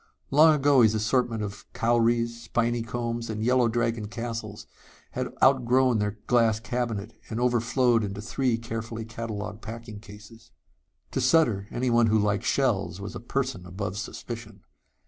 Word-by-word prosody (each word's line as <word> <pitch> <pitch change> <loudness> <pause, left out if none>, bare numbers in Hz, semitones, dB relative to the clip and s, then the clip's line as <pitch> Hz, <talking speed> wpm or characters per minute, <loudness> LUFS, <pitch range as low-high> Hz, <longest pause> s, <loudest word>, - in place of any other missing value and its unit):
Long 155 +2 +7
ago 140 -2 +4
his 110 -1 +4
assortment 115 0 0
of 100 +1 -8
cowries, 115 0 +1
spiny 120 0 0
combs 115 0 -3
and 110 0 -3
yellow 125 0 +3
dragon 115 -2 -1
castles 115 -2 -6 0.5
had - - -2 0.2
outgrown 130 -2 +4
their 105 0 -2
glass 115 -3 +3
cabinet 115 -2 -3 0.2
and 110 - -3
overflowed 120 -1 +2
into 100 0 -4
three 120 +2 0
carefully 115 0 -5
catalogued 110 -2 -6
packing 115 -1 -8
cases. 105 +2 -14 0.6
To - - -1
Sutter, 115 -12 +3
anyone 120 -2 +2
who 110 0 +3
liked 105 +1 0
shells 115 -10 0
was 100 0 -6
a - - -6
person 130 -4 -3
above 95 +1 -4
suspicion. 110 0 -7
115 Hz, 145 wpm, -26 LUFS, 105-120 Hz, 0.6 s, Long